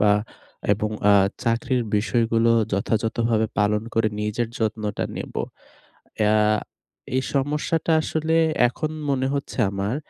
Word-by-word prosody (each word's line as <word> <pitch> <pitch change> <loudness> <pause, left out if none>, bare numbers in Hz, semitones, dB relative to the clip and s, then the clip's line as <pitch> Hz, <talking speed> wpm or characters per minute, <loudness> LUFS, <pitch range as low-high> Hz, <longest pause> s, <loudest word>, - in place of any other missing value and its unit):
বা 105 0 +5 0.6
এবং 105 +1 -1 0.2
আ - - +7 0.3
চাকরির 120 +2 0
বিষয়গুলো 115 +1 +2 0.2
যথাযথভাবে 110 +2 +1
পালন 105 0 +2
করে 115 -1 +3
নিজের 105 +2 -1
যত্নটা 110 -1 -2
নিবো? - - -4 0.8
এ - - +4
আ - - +4 0.7
এই 130 - +2
সমস্যাটা 150 +4 0
আসলে 160 +1 -1 0.3
এখন 155 +5 -4 0.2
মনে 130 -1 +1
হচ্ছে 140 -1 -4
আমার। 100 +5 -2
115 Hz, 120 wpm, -23 LUFS, 105-130 Hz, 0.8 s, আ